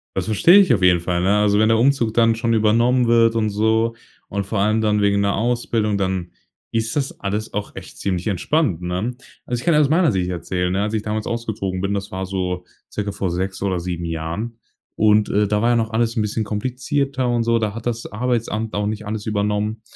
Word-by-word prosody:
Das -, -, -1 dB
verstehe 110 Hz, -, +5 dB
ich 185 Hz, -11 st, +5 dB
auf 100 Hz, -, 0 dB
jeden 90 Hz, -1 st, +5 dB
Fall, 85 Hz, +1 st, -1 dB
ne? 100 Hz, +3 st, +3 dB
Also, 105 Hz, -1 st, +3 dB
wenn 110 Hz, +1 st, +4 dB
der 115 Hz, -, +4 dB
Umzug 120 Hz, -2 st, +2 dB
dann 115 Hz, -1 st, +3 dB
schon 115 Hz, 0 st, 0 dB
übernommen 115 Hz, +3 st, +3 dB
wird 115 Hz, -1 st, +4 dB
und 110 Hz, -1 st, +1 dB
so 110 Hz, +2 st, +1 dB, 0.3 s
und 100 Hz, -1 st, -3 dB
vor 105 Hz, 0 st, -2 dB
allem 110 Hz, +2 st, +2 dB
dann 105 Hz, -1 st, +2 dB
wegen 100 Hz, 0 st, +2 dB
'ner 100 Hz, 0 st, +1 dB
Ausbildung, 115 Hz, -2 st, 0 dB
dann 95 Hz, -2 st, -2 dB, 0.4 s
ist 115 Hz, 0 st, -1 dB
das 135 Hz, -2 st, -2 dB
alles 105 Hz, +2 st, -3 dB
auch 105 Hz, 0 st, -4 dB
echt -, -, -10 dB
ziemlich 95 Hz, 0 st, -2 dB
entspannt, 105 Hz, -, 0 dB
ne? 90 Hz, +8 st, -3 dB, 0.3 s
Also, 120 Hz, -1 st, -3 dB
ich -, -, -11 dB
kann 170 Hz, -, +4 dB
ja 150 Hz, -, +5 dB
aus 145 Hz, -, +4 dB
meiner 165 Hz, -1 st, +3 dB
Sicht 90 Hz, -3 st, -1 dB
erzählen, 90 Hz, 0 st, -2 dB
ne? 100 Hz, -, 0 dB
Als 105 Hz, +1 st, -2 dB
ich 110 Hz, -1 st, -1 dB
damals 110 Hz, 0 st, -3 dB
ausgezogen 110 Hz, -5 st, -3 dB
bin, 100 Hz, +2 st, -1 dB
das 100 Hz, 0 st, -4 dB
war 95 Hz, +1 st, -3 dB
so 90 Hz, -1 st, -3 dB, 0.3 s
circa 105 Hz, -1 st, -3 dB
vor 95 Hz, -3 st, -2 dB
6 95 Hz, +2 st, -3 dB
oder 95 Hz, -2 st, 0 dB
7 85 Hz, -1 st, -4 dB
Jahren 85 Hz, +8 st, -4 dB, 0.4 s
und, 105 Hz, 0 st, +3 dB
äh, 105 Hz, +1 st, +2 dB
da 105 Hz, +1 st, 0 dB
war 120 Hz, -, +2 dB
ja -, -, +3 dB
noch 110 Hz, -1 st, -1 dB
alles 115 Hz, +1 st, 0 dB
'n 110 Hz, -, +2 dB
bisschen 105 Hz, +1 st, -1 dB
komplizierter 130 Hz, +4 st, -2 dB
und 120 Hz, -1 st, +1 dB
so. 115 Hz, 0 st, +2 dB
Da 110 Hz, -2 st, -1 dB
hat 115 Hz, 0 st, -8 dB
das 120 Hz, -1 st, -2 dB
Arbeitsamt 115 Hz, -1 st, -2 dB
auch 105 Hz, 0 st, -1 dB
nicht 110 Hz, 0 st, -4 dB
alles 105 Hz, 0 st, -4 dB
übernommen 105 Hz, +1 st, -1 dB
105 Hz, 230 wpm, -21 LUFS, 100-115 Hz, 0.4 s, verstehe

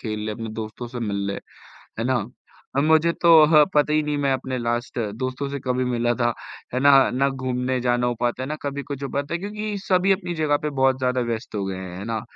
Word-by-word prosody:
खेल 110 Hz, -2 st, -4 dB
ले, 110 Hz, -, -2 dB
अपने 115 Hz, +1 st, -6 dB
दोस्तों 110 Hz, +3 st, -6 dB
से 120 Hz, 0 st, -7 dB
मिल 100 Hz, -1 st, -2 dB
ले, 100 Hz, -, -3 dB, 0.6 s
है -, -, 0 dB
ना? 125 Hz, -5 st, +1 dB, 0.5 s
अब 140 Hz, -, +3 dB
मुझे 160 Hz, +2 st, +4 dB
तो 170 Hz, -, +4 dB, 0.2 s
ह 150 Hz, -1 st, +8 dB
पता 150 Hz, 0 st, +3 dB
ही 155 Hz, -, +3 dB
नहीं 150 Hz, -1 st, -1 dB
मैं 140 Hz, -1 st, +1 dB
अपने 130 Hz, 0 st, -3 dB
लास्ट 120 Hz, +1 st, -2 dB, 0.2 s
दोस्तों 130 Hz, +2 st, -2 dB
से 140 Hz, 0 st, -4 dB
कभी 130 Hz, 0 st, -1 dB
मिला 120 Hz, -1 st, +1 dB
था, 120 Hz, -1 st, +1 dB, 0.4 s
है 130 Hz, -, 0 dB
ना, 135 Hz, -1 st, +6 dB
ना 135 Hz, +2 st, +1 dB
घूमने 130 Hz, -1 st, -2 dB
जाना 120 Hz, 0 st, +1 dB
हो 120 Hz, -, -1 dB
पाता 120 Hz, +1 st, -1 dB
है, -, -, -4 dB
ना 155 Hz, -, -2 dB
कभी 140 Hz, 0 st, -4 dB
कुछ 140 Hz, -1 st, -6 dB
हो 135 Hz, -, -3 dB
पाता 140 Hz, +3 st, -2 dB
है 170 Hz, -, -1 dB
क्योंकि 210 Hz, +1 st, -4 dB
सभी 185 Hz, +1 st, +3 dB
अपनी 185 Hz, -2 st, -1 dB
जगह 150 Hz, -2 st, +2 dB
पे 150 Hz, -, -1 dB
बहुत 130 Hz, 0 st, +4 dB
ज़्यादा 125 Hz, 0 st, +1 dB
व्यस्त 115 Hz, -1 st, -4 dB
हो 100 Hz, -1 st, -1 dB
गए 95 Hz, -1 st, -4 dB
हैं। 90 Hz, -1 st, -7 dB
है 100 Hz, -, -6 dB
ना? 115 Hz, -2 st, -2 dB
130 Hz, 250 wpm, -23 LUFS, 120-145 Hz, 0.6 s, ह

